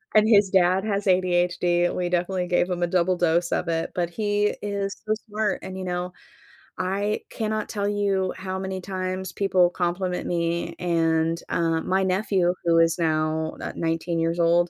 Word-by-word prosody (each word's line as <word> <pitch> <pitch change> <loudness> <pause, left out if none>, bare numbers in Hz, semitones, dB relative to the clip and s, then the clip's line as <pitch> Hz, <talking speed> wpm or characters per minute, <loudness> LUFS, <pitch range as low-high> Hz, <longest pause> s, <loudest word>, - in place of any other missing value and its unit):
And 215 0 +5
his 200 -3 +5
dad 185 0 +3
has 205 -2 -1
ADHD. 175 -1 +2
We 180 -1 -1
definitely 180 +1 0
gave 175 0 +1
him 175 -1 -1
a - - +2
double 180 +1 +1
dose 175 0 +1
of - - 0
it, 165 -1 -2
but 175 -1 -1
he 205 +1 0
is 200 -1 -3
so - - 0 0.2
smart. 210 -1 -1
And 190 0 -6
you 190 - -5
know, 180 0 -3 0.6
I 200 +3 -1
cannot 215 -1 -2
tell 200 -2 -2
you 200 -2 0
how 190 0 -4
many 190 0 -4
times 185 0 -4
people 185 -2 +2
compliment 180 +1 -2
me, 170 0 -1
and, 165 -1 +1
uh, 165 -1 +1
my 190 +3 +1
nephew, 185 -1 +1
who 165 -1 +4
is 165 +1 +3
now 160 -1 0
ni - - -4
nineteen 165 +1 -1
years 165 +1 0
old 170 +1 +3
180 Hz, 175 wpm, -24 LUFS, 170-195 Hz, 0.6 s, And